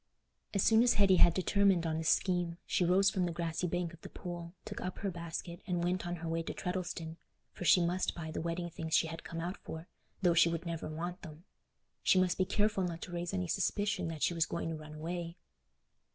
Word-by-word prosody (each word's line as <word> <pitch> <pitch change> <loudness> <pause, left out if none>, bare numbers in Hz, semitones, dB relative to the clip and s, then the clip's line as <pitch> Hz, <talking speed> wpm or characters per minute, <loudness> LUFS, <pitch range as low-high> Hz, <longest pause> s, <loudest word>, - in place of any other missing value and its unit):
As 200 - +3
soon 225 0 +6
as 240 0 +4
Hetty 195 -3 +5
had 170 - +7
determined 190 -2 +3
on 160 -1 0
this 160 - +1
scheme, 175 -2 +1
she - - +1
rose 190 +3 +4
from 185 -2 0
the - - -2
grassy 170 +1 -2
bank 175 -1 -2
of 170 - -14
the - - -9
pool, 175 -1 -7
took - - -6
up 180 0 -4
her 200 - -2
basket, 170 +1 -6
and 175 -2 0
went 180 0 0
on 175 - -2
her 165 -1 -6
way 165 0 0
to - - -5
Treddleston, 175 -3 -4 0.3
for 180 - -7
she 175 0 +6
must 180 +2 0
buy 160 -2 -5
the - - -3
wedding 170 +1 -2
things 160 -1 -1
she - - +4
had 165 +1 -6
come 165 - -6
out 175 +4 -3
for, 160 +2 -8 0.4
though 175 -2 +5
she 165 0 +6
would 165 +1 -3
never 170 -1 -3
want 175 +4 -4
them. 160 -2 -10 0.6
She 185 - +4
must 185 0 +2
be 185 - +4
careful 210 0 +1
not 170 -2 -3
to - - -7
raise 175 0 -3
any 90 -1 -1
suspicion 200 - 0
that 160 -2 -4
she - - +3
was 165 -1 +1
going 170 -1 -3
to 165 - -2
run 155 0 -9
away. 170 +2 -4
175 Hz, 235 wpm, -33 LUFS, 165-185 Hz, 0.6 s, had